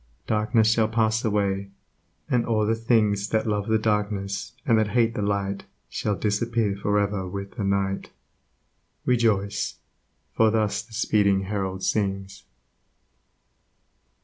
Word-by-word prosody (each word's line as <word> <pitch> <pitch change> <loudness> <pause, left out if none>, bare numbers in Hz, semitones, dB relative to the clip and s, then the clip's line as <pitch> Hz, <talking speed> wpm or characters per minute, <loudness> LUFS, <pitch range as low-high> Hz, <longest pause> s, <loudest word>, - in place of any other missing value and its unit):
Darkness 110 +1 +2
shall 110 -1 +3
pass 110 0 +1
away, 100 -2 0 0.6
and 120 -2 +2
all 110 -2 +1
the 110 - +2
things 110 -3 +1
That 110 -1 +1
love 105 -2 -1
the 110 0 +3
darkness, 105 -2 -1
and 115 - +4
that 110 - +2
hate 115 -1 +3
the 105 - -3
Light 100 -1 -1 0.2
Shall 105 -2 -1
disappear 105 0 0
for 100 +1 0
ever 100 -2 0
with 100 +1 -6
the 110 - -5
Night: 100 0 -1 1.0
Rejoice! 110 -5 +1 0.6
for 110 -1 +4
thus 105 -1 +1
the 110 +1 -18
speeding 100 -2 +2
Herald 95 -1 -3
sings. 95 -2 -2
105 Hz, 130 wpm, -25 LUFS, 100-110 Hz, 1.0 s, and